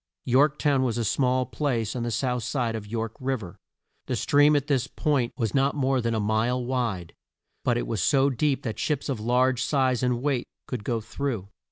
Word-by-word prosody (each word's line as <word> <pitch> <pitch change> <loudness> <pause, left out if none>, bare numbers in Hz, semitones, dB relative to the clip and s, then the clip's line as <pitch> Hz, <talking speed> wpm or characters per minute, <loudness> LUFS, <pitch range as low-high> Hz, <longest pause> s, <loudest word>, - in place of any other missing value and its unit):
York 140 +4 +3
town 140 -3 +2
was 120 -3 0
a 115 - 0
small 130 +3 +1
place 125 -8 -2
on 125 - -2
the 120 - -1
south 125 +2 -1
side 120 0 -1
of 105 -2 -6
York 115 0 -3
Riv 130 -4 -2
er. 90 -2 -10 0.5
The - - -1
stream 145 +1 +4
at 145 -1 +1
this 135 -3 +1
point 135 -6 0
was 115 -6 -1
not 135 +1 +2
more 135 -2 +1
than 115 -1 0
a - - 0
mile 110 +4 0
wide, 115 -9 -2 0.5
but 120 -1 +2
it - - -1
was 110 -5 -2
so 140 -1 +3
deep 135 +2 0
that 110 -3 -4
ships 150 -2 -1
of 130 -5 -2
large 125 +3 +2
size 130 -4 +1
and 125 -1 +1
weight 140 -4 0 0.2
could 125 -5 -5
go 115 0 -1
through. 110 -3 -4
125 Hz, 210 wpm, -26 LUFS, 115-135 Hz, 0.5 s, stream